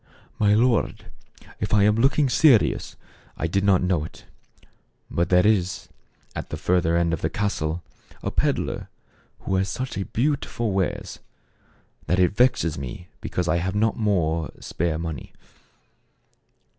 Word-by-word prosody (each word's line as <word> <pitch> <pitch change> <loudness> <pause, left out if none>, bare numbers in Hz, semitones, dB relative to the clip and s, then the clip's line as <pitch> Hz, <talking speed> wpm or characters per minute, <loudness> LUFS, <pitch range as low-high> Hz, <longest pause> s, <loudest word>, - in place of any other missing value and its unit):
"My 105 -1 +4
lord, 120 +1 +1 0.5
if - - 0
I 100 - +5
am 105 +1 +4
looking 140 +4 +3
serious, 130 - +3 0.4
I - - -2
did 95 +4 0
not 95 -3 +4
know 90 -4 +1
it; 80 - -11 0.9
but 85 - 0
there 90 +1 +4
is, 95 -4 +1 0.5
at - - -5
the - - -4
further 85 -2 +2
end 85 -1 +1
of 80 - -2
the 80 - 0
castle, 85 -6 -2 0.4
a - - -2
peddler - - -1 0.5
who - - -3
has 95 0 0
such 125 +1 -4
beautiful 125 -3 -1
wares 95 -1 -2 0.9
that 90 - +2
it 90 -1 +4
vexes 115 - +2
me 70 +7 -7
because 90 -1 -3
I 85 - +2
have 95 +3 -2
not 110 +1 +2
more 85 -7 0
spare 80 -1 -2
money." 80 -2 -6
95 Hz, 145 wpm, -24 LUFS, 85-110 Hz, 0.9 s, I